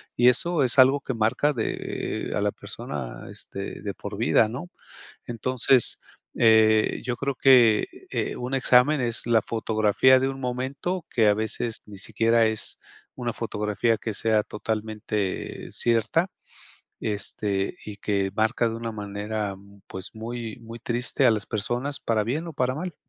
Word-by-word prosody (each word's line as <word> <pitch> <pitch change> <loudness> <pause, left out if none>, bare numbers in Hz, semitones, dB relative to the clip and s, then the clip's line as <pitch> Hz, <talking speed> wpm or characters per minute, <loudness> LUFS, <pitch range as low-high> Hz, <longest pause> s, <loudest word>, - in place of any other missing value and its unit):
Y 120 +1 +6
eso 155 +5 +2
es 130 +1 +3
algo 135 +2 +6
que 130 - -4
marca 115 +7 +1
de 115 -5 -3
a - - 0
la - - +1
persona, - - -7
este, 100 0 -7
de 100 -2 -4
por 100 0 -7
vida, 115 0 +3
¿no? 140 +10 -7 0.6
Entonces, 125 +1 +2 0.4
eh, 110 -1 +4
yo 120 -2 -2
creo 140 +3 -1
que, 120 -5 +5 0.2
eh, - - -2
un 125 +2 -5
examen 130 +2 +4
es 120 -2 0
la 115 -2 +4
fotografía 110 +3 +3
de 135 +1 0
un 135 0 -6
momento, 135 +8 -3
que, 115 -3 +3
a 105 - +6
veces, 110 +1 -1
ni 100 - -10
siquiera 115 +3 +2
es 110 -1 0 0.4
una 120 -2 -3
fotografía 110 0 -1
que 110 +1 -4
sea 110 0 +2
totalmente 105 -2 -4
cierta, 120 - +1 0.7
este, 100 -2 -2
y 105 -1 -7
que 100 -2 -1
marca 110 +2 +2
de 115 - -4
una 115 0 -5
manera, 105 0 -4 0.3
pues, 95 +3 -7
muy, 115 0 -6
muy 115 0 -9
triste 120 +3 0
a - - +6
las 105 0 -2
personas 120 +7 -2
para 110 -2 0
bien 150 +9 -2
o - - -7
para 130 0 0
mal. 175 +2 -5
115 Hz, 155 wpm, -25 LUFS, 110-125 Hz, 0.7 s, Y